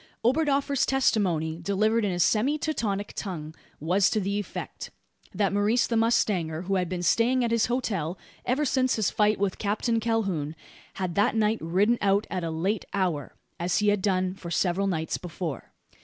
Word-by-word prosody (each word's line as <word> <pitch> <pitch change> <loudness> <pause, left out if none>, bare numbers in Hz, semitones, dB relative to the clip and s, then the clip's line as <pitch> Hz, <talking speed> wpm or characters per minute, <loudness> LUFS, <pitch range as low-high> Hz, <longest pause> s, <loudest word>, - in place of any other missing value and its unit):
Oberdoffer's 280 0 +2
testimony, 180 -12 +1
delivered 215 +5 +1
in 200 - +1
a 175 - -2
semi 220 - +2
Teutonic 210 -10 -2
tongue, 160 -6 -5 0.3
was 185 +5 +2
to 215 - 0
the 200 +1 -1
effect: 205 - -6 0.4
that 200 0 0
Maurice 210 +4 +2
the 235 - -2
mustanger 190 -8 +1
who 195 +2 -2
had 180 -2 -1
been 180 -1 -3
staying 245 +6 +3
at 235 - 0
his 230 -1 +2
hotel 195 -9 -2 0.3
ever 270 +5 0
since 260 -1 +2
his 215 -3 0
fight 210 0 +2
with 195 -2 -1
Captain 220 +3 0
Calhoun 195 -10 -1 0.4
had 185 -3 -3
that 205 +5 +2
night 220 0 +2
ridden 195 +8 +2
out 200 +1 +2
at 185 -2 -2
a 165 - -2
late 185 +7 -1
hour, 175 -8 -1 0.2
as 175 +1 0
he 210 0 +3
had 205 -1 +1
done 185 -2 +1
for 185 -3 -9
several 180 +3 +1
nights 160 -4 -2
before. 170 -5 -6
200 Hz, 175 wpm, -27 LUFS, 180-225 Hz, 0.4 s, staying